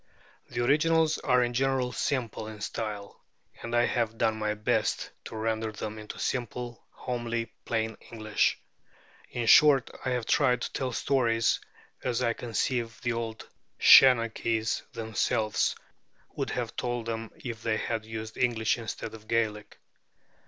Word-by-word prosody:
The 120 0 -2
originals 155 +3 +3
are 125 -2 +3
in 120 0 -1
general 130 0 +1
simple 120 -5 -2
in 110 -1 -8
style; 105 -2 -5 0.4
and 115 0 -3
I 120 0 +4
have 115 -2 -1
done 110 - +2
my 105 -1 -1
best 105 - 0
to - - -8
render 110 0 -1
them 110 0 -6
into 105 - -8
simple, 120 -1 -3
homely, 120 -2 -4
plain 110 -1 -1
English. 110 -2 0 0.7
In 120 -1 -3
short, 135 +2 +6
I 130 - -1
have 125 -2 -1
tried 125 -4 +3
to - - -4
tell 130 - -1
the 120 - -6
stories 115 -4 +2 0.4
as 125 0 0
I 115 -1 +2
conceive 115 0 -2
the 120 -1 0
old 115 -1 -5 0.3
Shenachies 115 -3 +5
themselves 110 -2 0 0.6
would - - -2
have - - -3
told 120 -2 -2
them 115 -1 -4
if 115 -3 -7
they 110 -2 0
had 115 -1 -2
used 110 0 -7
English 120 -2 +1
instead 110 -1 -6
of 110 -1 -12
Gaelic." 110 -2 -1
115 Hz, 145 wpm, -28 LUFS, 110-125 Hz, 0.7 s, short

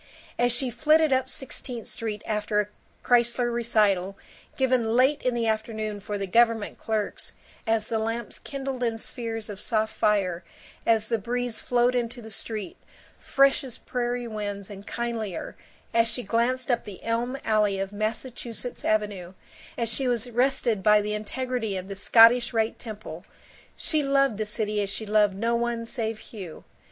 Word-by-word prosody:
As 245 0 +4
she 245 +1 0
flitted 310 +2 +4
up 260 0 +1
Sixteenth 250 -3 -6
Street 215 -2 -4
after 210 -1 0
a 210 - +1 0.4
Kreisler 240 0 +3
recital, 205 -5 +2 0.4
given 250 -4 +2
late 265 +4 +4
in 255 -1 0
the 235 -1 0
afternoon 215 -1 -2
for 205 +1 -4
the 200 - -2
government 230 +2 +2
clerks, 215 -2 -2 0.3
as 225 -1 +2
the 225 - 0
lamps 225 +1 -3
kindled 270 -2 -5
in 230 -2 0
spheres 225 -1 -5
of 205 -2 -7
soft 220 -1 0
fire, 185 -5 +1 0.4
as 220 -1 +3
the 230 - 0
breeze 240 +1 -2
flowed 245 0 +2
into 240 0 -1
the 220 -1 -9
street, 210 -2 -4 0.4
fresh 275 0 +3
as 255 -3 -7
prairie 245 -1 -2
winds 205 -2 -5
and 200 0 -10
kindlier, 230 -5 -3 0.4
as 230 0 +4
she 235 +2 -1
glanced 240 +4 +1
up 240 - +1
the 200 -3 -10
elm 235 +3 -1
alley 210 -3 +3
of 195 0 -3
Massachusetts 230 +3 -4
Avenue, 205 -4 0 0.4
as 235 -1 0
she 255 +4 0
was 245 0 -1
rested 245 -3 +2
by 210 +1 +6
the 210 0 -2
integrity 225 0 -2
of 185 0 -6
the 195 - -5
Scottish 230 +4 +6
Rite 225 0 0
Temple, 210 -7 -7 0.5
she 310 -2 +2
loved 275 -5 +2
the 215 - -1
city 210 -1 -1
as 200 - -2
she 220 +2 -4
loved 210 -2 +3
no 230 +4 +1
one 235 0 -1
save 225 -2 -2 0.2
Hugh. 185 -7 -8
225 Hz, 165 wpm, -26 LUFS, 210-245 Hz, 0.5 s, by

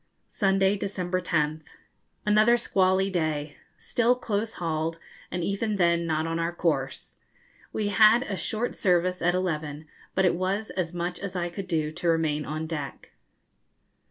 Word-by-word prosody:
Sunday, 195 0 +2
December 185 -2 -2
10th. 155 -3 0 0.6
Another 215 +3 +5
squally 190 -2 +2
day. 155 -4 -2 0.2
Still 245 +1 +2
close 220 -2 -2
hauled, 165 -1 -2 0.3
and 175 -1 -3
even 205 +3 -1
then 170 -2 +2
not 155 0 0
on 165 0 -2
our 165 +1 0
course. 150 -6 -2 0.5
We 210 -1 -1
had 215 +4 +6
a 210 - -3
short 215 +8 -2
service 180 -1 +1
at 175 +1 +2
eleven, 155 -4 -2 0.3
but 190 - +3
it 180 - +4
was 195 +4 -1
as 180 -3 -2
much 175 0 -3
as 200 -2 -6
I 175 -1 -1
could 190 +2 -6
do 155 -3 0
to 175 +2 -4
remain 155 -2 +1
on 155 +1 -3
deck. 150 -4 -6
180 Hz, 155 wpm, -27 LUFS, 160-195 Hz, 0.6 s, had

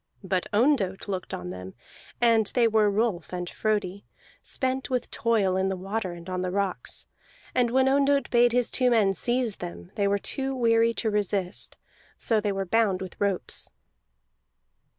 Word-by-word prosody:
But 185 -1 -1
Ondott 210 -5 +1
looked 190 -2 -4
on 90 0 -5
them, 90 +1 -8 0.4
and 230 -3 +4
they 240 -2 +5
were 215 -2 +3
Rolf 205 -3 -1
and 180 -1 -4
Frodi, 205 -1 -2 0.4
spent 260 0 -2
with 250 -2 -2
toil 220 -7 +1
in 190 0 +1
the 190 - -1
water 195 0 -3
and 170 0 -11
on 185 -1 -2
the 185 - -1
rocks. 195 0 -1 0.5
And 245 -2 +2
when 260 +2 +3
Ondott 280 0 +2
bade 240 0 +5
his 245 0 +1
two 255 -2 +3
men 215 -5 +3
seize 240 0 0
them, 85 0 -8
they 200 - +1
were 200 0 +2
too 270 +6 -1
weary 230 -1 +3
to 220 - 0
resist; 200 -2 -2 0.4
so 220 -2 +1
they 205 -1 0
were 195 0 -2
bound 205 -1 +2
with 190 +1 -9
ropes. 200 -3 -1
210 Hz, 170 wpm, -26 LUFS, 190-240 Hz, 0.5 s, they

